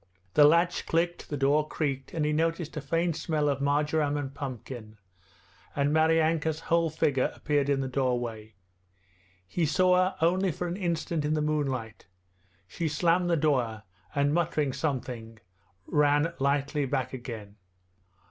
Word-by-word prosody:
The 150 - +7
latch 170 +3 +3
clicked, 170 +1 -1
the 145 - -3
door 145 +3 +2
creaked, 140 -4 -3
and 155 -3 -1
he 150 - +1
noticed 165 +1 -1
a 155 - -3
faint 165 +3 0
smell 155 -2 -1
of 140 -1 0
marjoram 145 +1 +1
and 135 -2 -4
pumpkin, 125 -5 -7 0.8
and 140 +1 +1
Maryanka's 160 0 +2
whole 170 0 +2
figure 145 -4 +1
appeared 145 -1 0
in 140 -1 +2
the 135 - -2
doorway. 120 -5 -2 0.9
He 160 - -1
saw 180 +4 +4
her 185 +1 +2
only 185 +3 +2
for 175 +4 -4
an 175 - -3
instant 170 -3 -2
in 150 +1 +1
the 155 - 0
moonlight. 135 -9 -2 0.6
She 165 - -3
slammed 170 +3 +2
the 170 - +3
door 125 -8 0 0.3
and, 145 0 +2
muttering 155 -5 0
something, 125 -6 -4 0.5
ran 150 +2 +2
lightly 140 +1 0
back 130 -1 -2
again. 115 -5 -7
150 Hz, 145 wpm, -28 LUFS, 135-165 Hz, 0.9 s, The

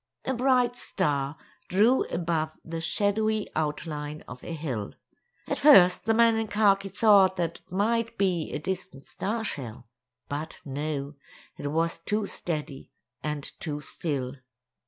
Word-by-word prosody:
A 265 - 0
bright 250 -1 +3
star 145 - -1 0.3
drew 220 +8 +4
above 165 -2 -1
the 165 0 -4
shadowy 215 +4 +1
outline 150 -1 -3
of 125 0 -10
a - - -6
hill. 135 -11 -4 0.5
At - - -2
first 190 -12 +7
the 225 0 +3
man 230 -1 +5
in 225 0 -1
khaki 200 -2 +3
thought 195 -1 +5
that 170 -3 -2
it - - -35
might 230 +4 0
be 180 -5 0
a - - -2
distant 155 -4 -5
star 225 +3 -3
shell; 125 - -5 0.4
but 150 +3 -5
no, 145 0 -3 0.4
it - - -5
was 165 +3 0
too 210 +5 -1
steady 150 -7 -5 0.3
and 150 -1 -3 0.2
too 150 -3 -3
still. 140 -4 -4
170 Hz, 140 wpm, -27 LUFS, 150-210 Hz, 0.5 s, first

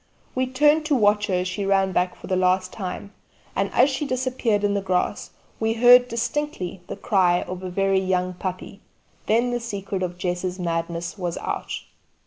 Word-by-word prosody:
We 255 0 0
turned 295 +4 +3
to 295 - +3
watch 210 -3 +3
her 190 - 0
as 180 +1 0
she 185 +2 -3
ran 195 -1 +2
back 180 0 0
for - - -12
the 185 - 0
last 185 0 +1
time, 200 0 -6 0.4
and - - 0
as - - +5
she 285 +2 -2
disappeared 255 -5 0
in 205 0 +2
the 200 - 0
grass 185 -2 -1 0.3
we 225 0 +1
heard 245 +2 +7
distinctly 235 - -3
the - - -5
cry 185 -5 +2
of 185 0 -7
a 185 - -5
very 195 +1 +2
young 185 -1 0
puppy. 185 +2 -6 0.5
Then 235 +3 +2
the 240 - -1
secret 200 -4 -4
of 180 -1 -3
Jess's 180 0 -2
madness 170 +1 -3
was 175 -2 -3
out. - - -4
195 Hz, 185 wpm, -24 LUFS, 180-235 Hz, 0.5 s, heard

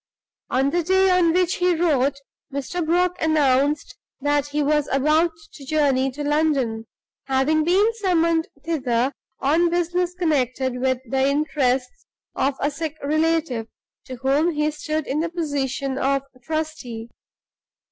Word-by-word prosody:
On 265 +2 +1
the 350 - +1
day 380 +2 +3
on 360 -2 +4
which 360 +1 +1
he 360 -1 +2
wrote, 290 -5 +2 0.4
Mr. 280 +6 -3
Brock 360 +3 +1
announced 290 -2 +2 0.2
that 290 0 +1
he 295 +1 -1
was 295 0 +1
about 305 +5 +3 0.2
to 285 - -12
journey 275 -2 +1
to 295 +2 -5
London; 285 -7 0 0.4
having 275 +4 +2
been 395 +7 +3
summoned 335 -6 +1 0.2
thither 265 -5 0 0.3
on 325 +5 +3
business 350 +1 0
connected 260 -7 0
with 260 0 +2
the 265 +3 +1
interests 280 - -1 0.3
of 275 0 0
a 285 - 0
sick 315 +1 -5
relative, 310 -5 0 0.4
to 255 - -7
whom 275 +7 +1
he 300 +1 +1
stood 310 0 -3
in 285 - -1
the 335 +2 -1
position 275 -5 -2
of 275 0 +1 0.2
trustee. 255 -6 -4
300 Hz, 135 wpm, -22 LUFS, 270-330 Hz, 0.4 s, on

